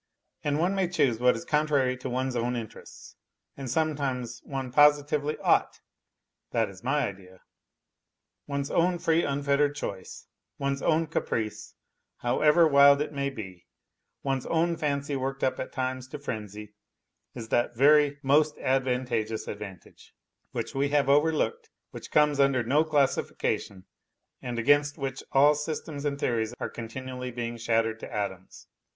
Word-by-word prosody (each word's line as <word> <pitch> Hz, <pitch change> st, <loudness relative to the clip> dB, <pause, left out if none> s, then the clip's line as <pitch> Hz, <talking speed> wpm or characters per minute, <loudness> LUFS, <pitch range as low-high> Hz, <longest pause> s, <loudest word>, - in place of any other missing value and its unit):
And 145 Hz, 0 st, 0 dB
one 175 Hz, +5 st, +1 dB
may 190 Hz, -2 st, +1 dB
choose 135 Hz, -10 st, +1 dB
what 125 Hz, 0 st, +4 dB
is 170 Hz, -, -7 dB
contrary 150 Hz, -5 st, +1 dB
to 130 Hz, -, -6 dB
one's 130 Hz, +1 st, -2 dB
own 120 Hz, +1 st, -1 dB
interests, 115 Hz, -3 st, -9 dB, 0.4 s
and 135 Hz, -2 st, -6 dB
sometimes 130 Hz, -5 st, -2 dB
one 135 Hz, -2 st, -5 dB
positively 145 Hz, +1 st, +3 dB
ought -, -, +1 dB, 0.7 s
(that -, -, 0 dB
is -, -, -15 dB
my -, -, +1 dB
idea). 95 Hz, -2 st, -11 dB, 1.1 s
One's 140 Hz, -1 st, -3 dB
own 175 Hz, +1 st, +2 dB
free 165 Hz, 0 st, +2 dB
unfettered 140 Hz, +1 st, +1 dB
choice, 100 Hz, -10 st, -6 dB, 0.3 s
one's 140 Hz, 0 st, -2 dB
own 165 Hz, 0 st, +2 dB
caprice, 115 Hz, -8 st, -3 dB, 0.4 s
however 150 Hz, +7 st, +4 dB
wild 140 Hz, -1 st, +6 dB
it 150 Hz, +1 st, -3 dB
may 140 Hz, 0 st, -1 dB
be, 95 Hz, -9 st, -9 dB, 0.6 s
one's 135 Hz, -2 st, -1 dB
own 170 Hz, +1 st, +1 dB
fancy 140 Hz, -2 st, -2 dB
worked 135 Hz, +1 st, -3 dB
up 130 Hz, -, 0 dB
at -, -, -5 dB
times 130 Hz, 0 st, -3 dB
to 150 Hz, -, -7 dB
frenzy 105 Hz, -6 st, -7 dB, 0.6 s
is 115 Hz, -2 st, -7 dB
that 120 Hz, 0 st, +1 dB
very 145 Hz, +1 st, +5 dB
" -, -, -44 dB
most 150 Hz, 0 st, +3 dB
advantageous 125 Hz, -4 st, -1 dB
advantage 100 Hz, -4 st, -10 dB, 0.2 s
" -, -, -49 dB
which -, -, -4 dB
we 140 Hz, +1 st, 0 dB
have 145 Hz, -1 st, +2 dB
overlooked, 160 Hz, -, +2 dB, 0.2 s
which -, -, -9 dB
comes 150 Hz, -1 st, +3 dB
under 135 Hz, -3 st, +3 dB
no 140 Hz, +7 st, +3 dB
classification 140 Hz, -9 st, -1 dB, 0.6 s
and 120 Hz, -1 st, -5 dB
against 145 Hz, +4 st, +3 dB
which 135 Hz, -1 st, -4 dB
all 145 Hz, +2 st, +6 dB
systems 150 Hz, -1 st, -5 dB
and 140 Hz, -1 st, -1 dB
theories 115 Hz, -2 st, -1 dB
are -, -, -3 dB
continually 125 Hz, +2 st, -6 dB
being 120 Hz, -1 st, -4 dB
shattered 115 Hz, -1 st, 0 dB
to -, -, -9 dB
atoms. 95 Hz, -3 st, -5 dB
135 Hz, 150 wpm, -27 LUFS, 120-150 Hz, 1.1 s, wild